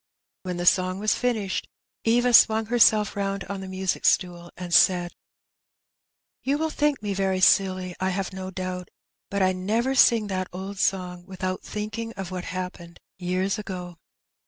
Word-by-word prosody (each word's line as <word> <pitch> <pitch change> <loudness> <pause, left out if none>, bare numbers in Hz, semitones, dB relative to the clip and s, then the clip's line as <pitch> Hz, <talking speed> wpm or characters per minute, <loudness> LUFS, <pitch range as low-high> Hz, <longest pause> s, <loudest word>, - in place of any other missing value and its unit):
When 180 -1 -4
the 175 - -3
song 185 +1 +3
was 215 +2 +1
finished, 220 -6 -1 0.4
Eva 240 +2 +3
swung 220 -1 +6
herself 215 -2 +4
round 200 -1 -2
on 195 0 -6
the 190 - -7
music 190 -1 -2
stool, 175 -1 +1
and 175 -1 -6
said 175 -1 +4 0.6
— - - -67
*'You 275 +2 +1
will 320 +1 -1
think 295 -7 0
me 205 -1 -1
very 190 -1 0
silly, 185 -1 +3
I 190 - 0
have 190 +1 -3
no 190 0 -6
doubt, 185 -1 -5 0.4
but 200 -1 0
I 185 0 +3
never 220 +8 0
sing 235 -4 +5
that 185 -2 -3
old 190 +2 -7
song 180 -2 -1
without 185 -1 -4
thinking 215 +2 -5
of 195 -3 -6
what 180 -1 -5
happened 180 -1 -6 0.2
years 185 +3 -1
ago.'' 180 -4 -7
190 Hz, 165 wpm, -25 LUFS, 185-210 Hz, 0.6 s, swung